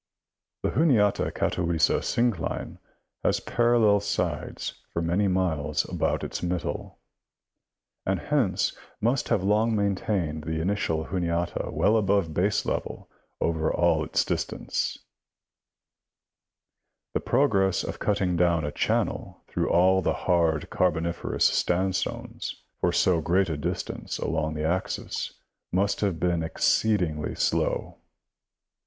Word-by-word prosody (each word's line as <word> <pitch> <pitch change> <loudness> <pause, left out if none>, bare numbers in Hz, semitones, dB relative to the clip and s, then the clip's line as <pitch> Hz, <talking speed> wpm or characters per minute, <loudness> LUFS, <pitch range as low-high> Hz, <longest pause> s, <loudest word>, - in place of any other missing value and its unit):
The - - +1
Juniata 120 -11 +3
Catawissa 85 -4 +1
syn 120 +1 +2
cline 85 -6 -5 0.4
has - - +2
parallel 115 -3 +3
sides 100 - -3
for - - -2
many 85 +5 +1
miles 80 -6 0
about - - -1
its - - -4
middle, 90 0 -3 1.1
and 95 0 0
hence 110 -11 +1 0.2
must 120 +4 +1
have 95 - +2
long 110 +3 +2
maintained 95 -6 -1
the 80 -1 -2
initial 80 -3 0
Juniata 85 -2 -1
well 110 - +3
above 100 -4 +2
baselevel 100 +5 -1 0.3
over 80 -1 0
all 85 -3 +2
this - - +1
distance; - - -2 2.2
the - - +1
progress 100 -8 +2
of - - -5
cutting 95 -4 +1
down 85 -2 +2
a 75 - -2
channel - - -1
through - - -1
all 95 +2 +4
the 90 - +1
hard 85 -4 +2
Carboniferous 85 -1 0
standstones 95 +1 -1 0.2
for - - +2
so 85 -3 +3
great 90 +3 +2
a 80 - -1
distance 75 - -4
along 80 -1 -1
the 75 0 -2
axis 90 +4 -2 0.4
must 100 +3 +1
have 95 -6 0
been 85 0 +1
exceedingly 80 -1 +1
slow. - - 0
90 Hz, 115 wpm, -26 LUFS, 80-100 Hz, 2.2 s, all